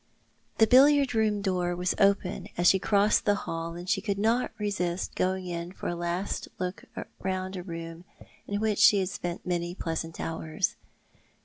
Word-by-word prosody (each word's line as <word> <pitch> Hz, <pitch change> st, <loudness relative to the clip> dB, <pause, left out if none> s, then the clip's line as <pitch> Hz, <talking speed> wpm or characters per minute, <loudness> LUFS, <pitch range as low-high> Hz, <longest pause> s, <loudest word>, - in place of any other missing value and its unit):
The 220 Hz, -, +6 dB
billiard 275 Hz, +2 st, +5 dB
room 215 Hz, -2 st, +1 dB
door 180 Hz, -2 st, 0 dB
was 180 Hz, 0 st, 0 dB
open 200 Hz, -2 st, +2 dB
as 175 Hz, 0 st, +3 dB
she 190 Hz, -, +6 dB
crossed 205 Hz, +2 st, +3 dB
the 205 Hz, -, +4 dB
hall, 165 Hz, 0 st, -4 dB
and 175 Hz, +1 st, -8 dB
she 195 Hz, +1 st, +1 dB
could 200 Hz, -1 st, -2 dB
not 225 Hz, +4 st, +1 dB
resist 190 Hz, -4 st, -2 dB
going 185 Hz, 0 st, -1 dB
in 170 Hz, 0 st, -4 dB
for -, -, -6 dB
a 175 Hz, -, -2 dB
last 175 Hz, +3 st, -3 dB
look 180 Hz, +1 st, -4 dB, 0.3 s
round 185 Hz, 0 st, -3 dB
a 180 Hz, -, -4 dB
room 165 Hz, -1 st, -8 dB, 0.4 s
in 205 Hz, 0 st, -2 dB
which 215 Hz, -1 st, 0 dB
she 205 Hz, -, +7 dB
had 190 Hz, -2 st, 0 dB
spent 175 Hz, -3 st, -5 dB
many 175 Hz, -1 st, -2 dB
pleasant 165 Hz, -2 st, -4 dB
hours. 160 Hz, +3 st, -2 dB
185 Hz, 175 wpm, -28 LUFS, 175-205 Hz, 0.4 s, she